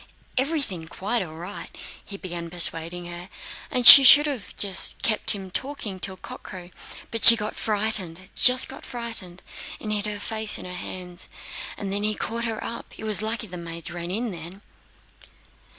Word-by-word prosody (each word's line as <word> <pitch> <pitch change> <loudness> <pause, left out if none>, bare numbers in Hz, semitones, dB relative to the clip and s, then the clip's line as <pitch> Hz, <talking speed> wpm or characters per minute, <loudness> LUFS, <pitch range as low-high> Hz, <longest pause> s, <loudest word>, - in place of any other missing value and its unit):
Everything 260 - -2
quite 210 +8 -3
all 160 -4 -8
right, 175 +5 -8
and - - -17 0.3
he 200 - -8
began 175 -3 -7
persuading 170 0 -1
her; 175 +2 -8 0.4
and 250 -1 -1
she 275 - +12
should 290 +3 +8
have 275 -8 -5 0.5
kept 215 -2 0
him 190 -2 -9
talking 225 -6 -5
till 190 0 -3
cockcrow, 180 -1 -11 0.4
but 225 - -4
she 230 - +12
got 210 -1 -5
frightened, 200 -5 0
just 255 0 +6
got 270 - -11
frightened 225 -7 -4 0.4
and 215 - -6
hid 210 0 -1
her 210 -1 -5
face 220 0 -2
in - - -9
her 180 - -7
hands. 180 0 -7 0.5
Then 200 0 -3
he 215 0 0
caught 230 +3 -4
her 225 -2 -4
up. 235 - -8
It - - -10
was 215 -1 -1
lucky 220 +1 -3
the 180 -3 -9
maids 170 -1 -7
ran 175 0 -6
in 225 +5 -2
just 170 -3 -8
then...." 185 +4 -11
200 Hz, 175 wpm, -24 LUFS, 175-225 Hz, 0.5 s, she